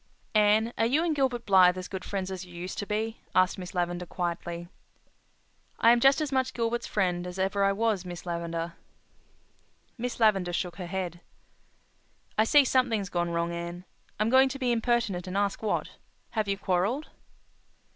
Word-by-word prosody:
'" - - -38
"Anne, 215 +2 +4
are 225 - +4
you 290 +7 +2
and 330 -3 0
Gilbert 255 -4 0
Blythe 185 -2 +6
as 185 - -5
good 190 -1 -6
friends 190 -2 -3
as 190 -1 -5
you 175 -1 -13
used 180 +2 -5
to 205 - -4
be?" 220 +2 -2
asked 185 +1 +3
Miss 180 0 -8
Lavendar 175 0 -1
quietly. 175 -1 -4 1.1
"I 230 - +6
am 240 - +5
just 270 +4 +5
as 300 -2 -2
much 260 -1 0
Gilbert's 235 0 -1
friend 180 -3 0
as 180 +1 -7
ever 195 +1 +1
I 195 - +4
was, 210 -2 0
Miss 175 -1 -8
Lavendar." 170 -1 -3 1.3
Miss 245 +1 -3
Lavendar 195 -6 +3
shook 175 0 -2
her 180 - -5
head. 180 -2 -4 1.2
"I 215 - +3
see 285 +4 +6
something's 235 -7 +1
gone 175 -1 -1
wrong, 170 0 -1
Anne. 170 +1 -6 0.3
I'm 215 +2 +1
going 265 +1 +6
to 275 - -5
be 255 -2 0
impertinent 230 -6 0
and 185 +2 -3
ask 200 -1 0
what. 215 -2 -1 0.4
Have 215 -2 -1
you 200 0 0
quarrelled?" 195 - 0
195 Hz, 180 wpm, -28 LUFS, 180-230 Hz, 1.3 s, Blythe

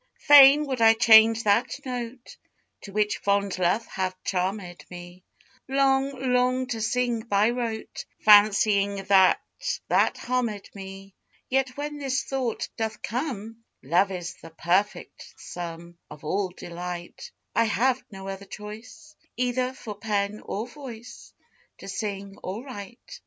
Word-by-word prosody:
Fain 290 +1 +8
would 260 -4 -3
I 225 0 +7
change 225 0 +6
that 230 +7 +1
note 245 -1 -6 0.5
To 200 - -10
which 210 +1 0
fond 200 -2 0
love 185 +6 +1
hath 185 -1 -3
charm'd 185 -1 -3
me, 175 0 -11 0.4
Long, 270 -1 +1
long 255 +1 +2
to 225 -3 -3
sing 240 +1 0
by 215 0 +1
rote, 230 -3 -5 0.2
Fancying 205 -1 +5
that 190 -2 +6 0.5
that - - +2
harm'd 235 -5 -2
me: 195 0 -10 0.4
Yet 265 0 0
when 295 0 -5
this 270 -1 -1
thought 260 -4 -3
doth 220 -1 -4
come, 230 -3 -4 0.2
"Love 180 +8 +2
is 175 -2 -5
the 165 - -11
perfect 180 +5 -2
sum 170 0 -8
Of 150 - -12
all 190 +5 -1
delight," 175 0 -8 0.3
I - - +4
have 250 +4 +1
no 195 -3 -9
other 195 0 -6
choice 215 +10 -11 0.2
Either 250 +1 0
for 245 -5 -8
pen 205 0 -2
or 210 +3 -4
voice 245 -3 -11 0.5
To - - -11
sing 195 0 -5
or 200 +6 -5
write. 255 - -10
215 Hz, 135 wpm, -25 LUFS, 195-250 Hz, 0.5 s, Fain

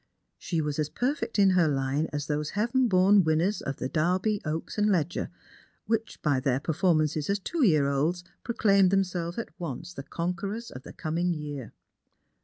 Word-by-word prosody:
She 165 -3 -1
was 150 0 -2
as 150 -1 0
perfect 250 - -2
in 195 -2 +5
her 180 -3 +4
line 140 +2 0
as 145 -1 -3
those 150 0 -2
heaven 240 +4 +2
born 190 0 +5
winners 165 +6 +1
of 135 - -3
the 130 - -3
Derby, 185 +8 +1
Oo.ks, 160 +7 -3
and 210 0 +3
Leger, 170 -3 0 0.6
which, 225 0 -2
by 145 -4 +2
their 130 -1 +1
performances 155 -1 +1
as 200 - +2
two 300 - -2
year 155 - +4
olds, 155 +6 0 0.2
proclaim 200 -5 +3
them 195 +1 +3
selves 175 -2 -4
at 230 - -4
once 170 +1 -5
the 135 - -6
conquerors 180 - -4
of 125 - -8
the - - -11
coming 170 +2 -1
year. 145 -6 -6
170 Hz, 180 wpm, -28 LUFS, 150-200 Hz, 0.6 s, in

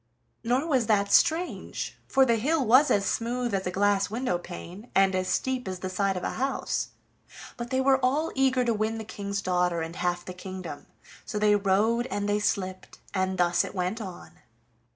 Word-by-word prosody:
Nor 250 +5 +1
was 260 -8 +1
that 200 -2 +2
strange, 335 +3 +1
for 270 0 +4
the 235 -2 +3
hill 285 +4 +1
was 260 +7 +6
as 200 -1 +2
smooth 240 0 -1
as 190 -1 -1
a - - +1
glass 200 +1 +2
window 225 -5 -1
pane, 180 +5 -9
and 195 0 +4
as 185 0 0
steep 255 +6 -1
as 185 -1 -3
the 185 +1 -5
side 195 0 0
of 180 - -5
a - - -1
house. 270 0 -1 0.7
But 240 0 -6
they 260 0 +1
were 265 0 +4
all 290 +6 +1
eager 260 -2 +2
to 235 - +2
win 220 +1 -1
the 220 - -5
King's 200 -2 -4
daughter 180 -2 +1
and 165 +1 -5
half 175 0 -1
the 185 - -6
kingdom, 185 -4 -8 0.4
so - - -5
they 210 0 +4
rode 210 +5 +2
and 205 -3 -2
they 205 0 +1
slipped, 185 -2 -2 0.2
and 190 -1 0
thus 175 0 +3
it - - -7
went 185 +5 -2
on. 185 -4 -9
205 Hz, 195 wpm, -27 LUFS, 185-245 Hz, 0.7 s, was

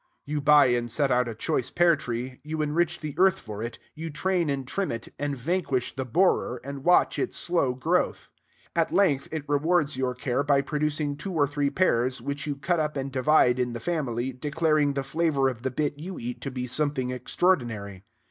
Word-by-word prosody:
You 150 0 -2
buy 145 0 +6
and 120 -1 +1
set 135 +3 +1
out 125 0 +3
a 115 - -5
choice 115 +2 -1
pear 170 -1 +4
tree; 125 -1 -5
you 155 +1 -2
enrich 170 +3 0
the 155 -2 -4
earth 190 0 +5
for 105 - -8
it; 115 +1 -5 0.2
you 165 +1 -6
train 175 +1 0
and 135 -2 -2
trim 195 +6 -1
it, 115 -1 -7
and 145 -1 -2
vanquish 135 -2 -1
the 130 -1 -3
borer, 125 -3 +2
and 140 0 -7
watch 180 +2 +4
its - - -1
slow 155 -8 +1
growth. 125 - 0 0.5
At 165 -1 +1
length 165 -7 +2
it 155 -2 -4
rewards 150 0 +1
your 130 -1 -1
care 125 +1 -1
by 140 -1 +3
producing 150 0 -1
two 190 +5 -5
or 150 -4 +3
three 145 0 -1
pears, 130 -7 +1
which 140 +3 -4
you 145 - -1
cut 170 +5 0
up 150 -1 -1
and 135 0 -3
divide 130 -2 +3
in 125 -1 0
the 115 - -4
family, 130 -4 -2
declaring 150 +2 +1
the 140 - -1
flavor 145 -1 +1
of 120 -3 -7
the 130 - -1
bit 145 +2 -2
you 180 +4 -6
eat 120 +1 -6
to 135 - -3
be 125 -1 -4
something 130 -1 -1
extraordinary. 120 - -1
140 Hz, 205 wpm, -26 LUFS, 125-155 Hz, 0.5 s, buy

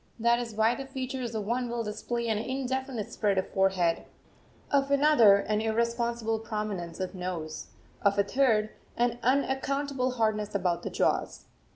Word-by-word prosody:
That 235 +1 +3
is 230 -3 -5
why 220 +2 +3
the 270 +1 -6
features 260 -3 -4
of 210 -2 -2
one 245 +3 -1
will 235 0 -2
display 235 +2 -3
an 220 -2 +1
indefinite 260 -2 -3
spread 200 -3 +1
of 190 - 0
forehead, 190 -3 +2 0.7
of 280 -1 +2
another 280 -7 +6
an 210 +1 0
irresponsible 235 0 0
prominence 210 -6 -4
of 185 0 -3
nose, 180 -4 -5 0.3
of 200 0 +2
a 200 - +4
third 215 -2 +2 0.3
an 240 0 +1
unaccountable 270 0 0
hardness 215 -3 0
about 180 -3 0
the - - -4
jaws. - - 0
230 Hz, 155 wpm, -29 LUFS, 205-255 Hz, 0.7 s, another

